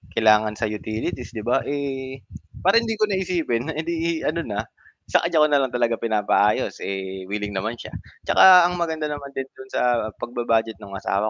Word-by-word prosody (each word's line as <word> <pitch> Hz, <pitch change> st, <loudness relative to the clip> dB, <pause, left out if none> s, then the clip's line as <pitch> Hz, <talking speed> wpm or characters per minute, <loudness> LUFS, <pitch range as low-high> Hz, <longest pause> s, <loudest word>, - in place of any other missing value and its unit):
kailangan 110 Hz, -1 st, +4 dB
sa 115 Hz, -, -6 dB
utilities, 110 Hz, +3 st, -5 dB
'di 110 Hz, -, -4 dB
ba? 120 Hz, +3 st, +2 dB
Eh, 135 Hz, -2 st, -4 dB, 0.4 s
parang 230 Hz, +5 st, +4 dB
hindi 225 Hz, -, -1 dB
ko 215 Hz, -, 0 dB
na 190 Hz, -, +1 dB
isipin 160 Hz, -9 st, -1 dB
edi 165 Hz, 0 st, -2 dB
ano 160 Hz, +3 st, 0 dB
na, 105 Hz, -1 st, -2 dB, 0.5 s
sa -, -, +5 dB
kaniya 155 Hz, -2 st, +3 dB
ko -, -, +5 dB
na 145 Hz, -, +5 dB
lang 130 Hz, -2 st, 0 dB
talaga 120 Hz, -1 st, +1 dB
pinapaayos. 105 Hz, -1 st, +1 dB
Eh, 95 Hz, -1 st, -5 dB
willing 105 Hz, 0 st, -3 dB
naman 105 Hz, +4 st, -3 dB
siya. -, -, -10 dB, 0.3 s
'Tsaka 185 Hz, -2 st, +8 dB
ang 175 Hz, 0 st, 0 dB
maganda 160 Hz, -3 st, -2 dB
naman 145 Hz, -1 st, -5 dB
din 135 Hz, -, -2 dB, 0.2 s
do'n 130 Hz, -, -10 dB
sa -, -, +1 dB, 0.4 s
pag-ba-budget 115 Hz, -3 st, -1 dB
ng 100 Hz, -1 st, -9 dB
asawa 100 Hz, +2 st, -1 dB
125 Hz, 185 wpm, -23 LUFS, 110-160 Hz, 0.5 s, Tsaka